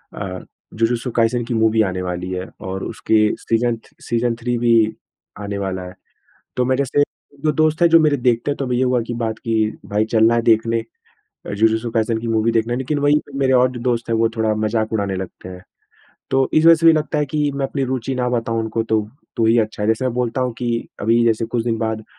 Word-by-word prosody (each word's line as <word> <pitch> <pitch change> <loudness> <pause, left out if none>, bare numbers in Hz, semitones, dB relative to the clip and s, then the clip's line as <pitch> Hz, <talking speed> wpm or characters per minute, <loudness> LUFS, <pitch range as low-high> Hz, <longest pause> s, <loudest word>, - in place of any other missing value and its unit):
अ, 95 -2 -5 0.3
जूजूत्सु 115 +2 0
काइसेंन 115 +1 +1
की 120 - -3
मूवी 110 0 +3
आने 95 -2 -2
वाली 90 0 -4
है। 90 0 -4
और 95 0 -5
उसके 110 -1 +1
सीज़न 115 0 0 0.2
सीज़न 120 0 -1
थ्री 120 0 -1
भी 120 0 +3 0.6
आने 100 -1 -4
वाला 95 -2 -3
है। 90 +1 -10 0.6
तो 125 - +1
मेरे 130 +2 +1
से 145 +3 +2 0.4
जो 155 - +3
दोस्त 155 +1 +1
हैं 170 - +7
जो 165 0 +7
मेरे 150 -2 +3
देखते 125 +1 +1
हैं 145 - -3
तो 130 -3 -3
ये 125 +1 +2
हुआ 125 -1 +1
कि 120 - -3
बात 115 -2 -3
किए 110 -2 0
कि - - -12
भाई 105 +2 +1
चलना 115 +1 +4
है 120 - +2
देखने 115 0 +2 0.7
अ, - - -5
जूजूत्सु 110 +2 +1
काइसेंन 110 0 0
की 115 - -4
मूवी 115 0 +1
देखना 115 +1 0
है। 120 - -1
लेकिन 135 +3 -2
वही 145 +1 +3
मेरे 135 -1 +1
और 125 0 +4
जो 120 -2 -7
दोस्त 120 -1 -1
हैं 115 - +1
वो 115 0 +3
थोड़ा 110 -1 +1
मज़ाक 110 +1 -1
उड़ाने 100 -3 -1
लगते 95 0 -7
हैं। 90 0 -10 0.7
तो 135 0 +2
इस 155 - +4
वज़ह 165 - +9
से 165 +1 +1
भी 165 - +9
लगता 155 -1 -1
है 150 - 0
कि 150 +1 0
मैं 140 -1 -1
अपनी 135 0 -3
रूचि 130 0 -3
ना 125 -1 -1
बताऊँ। 115 -2 -1
उनको 110 0 -2
तो 110 -1 +1 0.4
तो 115 - +1
ही 115 +1 +4
अच्छा 110 -1 -1
है। - - 0
वैसे 110 +3 +1
अब 130 - 0
बोलता 125 +1 -1
हूँ 125 -1 0
कि 120 -2 -2
अभी 115 +2 +3
जैसे 115 0 +2
कुछ 115 0 -2
दिन 115 -1 0
बाद 110 -1 -2
115 Hz, 235 wpm, -20 LUFS, 110-125 Hz, 0.7 s, वज़ह